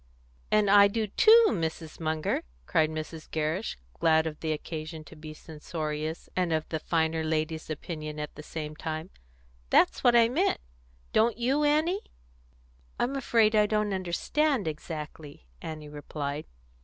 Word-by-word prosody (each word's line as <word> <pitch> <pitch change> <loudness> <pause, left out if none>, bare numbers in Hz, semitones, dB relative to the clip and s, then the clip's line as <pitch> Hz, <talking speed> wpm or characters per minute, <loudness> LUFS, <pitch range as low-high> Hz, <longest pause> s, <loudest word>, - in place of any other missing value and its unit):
"And 210 -1 +3
I 200 0 +8
do 220 +2 -1
too, 445 - +6
Mrs. 160 -2 -3
Munger!" 155 -1 -1 0.2
cried 155 - +2
Mrs. 155 0 -6
Gerrish, 160 +7 -2 0.2
glad 160 0 +4
of 155 -1 -4
the 160 - -2
occasion 155 +1 -5
to 160 - -14
be 155 0 -9
censorious 155 0 -5
and 180 -2 +1
of 155 -1 0
the 160 - -2
finer 160 0 0
lady's 155 0 -2
opinion 155 -1 -5
at 150 - -5
the 150 - -9
same 155 0 -6
time. 160 +3 -5 0.6
"That's - - +4
what 240 -1 +5
I 230 -1 +7
meant. 325 +12 +1 0.5
Don't 225 +1 +3
you, 265 +5 +1
Annie?" 310 +7 +2 1.0
"I'm 265 +3 0
afraid 230 -5 +3
I 210 -1 +5
don't 210 -1 0
understand 200 - 0
exactly," 150 - -7 0.2
Annie 155 -2 -6
replied. 145 0 -5
160 Hz, 145 wpm, -28 LUFS, 155-210 Hz, 1.0 s, I